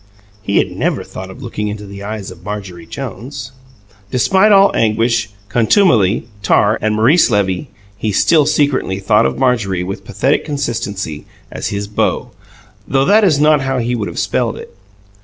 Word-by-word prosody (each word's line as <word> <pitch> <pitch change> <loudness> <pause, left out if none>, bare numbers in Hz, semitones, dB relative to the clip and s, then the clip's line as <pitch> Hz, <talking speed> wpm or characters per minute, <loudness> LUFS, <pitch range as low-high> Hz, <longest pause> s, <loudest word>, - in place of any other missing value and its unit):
He 100 0 -1
had - - +1
never - - -1
thought 95 0 -9
of 125 +9 -11
looking 105 -3 -4
into 105 0 -5
the 100 0 -10
eyes 105 -1 -6
of - - -14
Marjorie 95 -5 -7
Jones. 130 - -7 0.6
Despite 190 - +3
all 195 0 +5
anguish, 115 +1 +1 0.2
contumely, 115 - +3
tar, 105 +1 +2
and 110 0 0
Maurice 130 +11 +4
Levy, 100 +4 0 0.3
he 105 0 -2
still 150 - +3
secretly 145 -10 +1
thought 105 +2 +3
of - - -4
Marjorie, 115 -8 +1
with 95 +2 -6
pathetic 130 +9 0
constancy, 115 - -4 0.2
as - - -4
his 100 0 -3
"beau" 105 - -1 0.6
though 135 0 +2
that 215 +5 +5
is 160 -8 +3
not 150 -1 +4
how 135 -1 -1
he 120 0 -1
would 110 -4 -2
have - - -8
spelled - - -1
it. - - -11
115 Hz, 165 wpm, -16 LUFS, 100-140 Hz, 0.6 s, all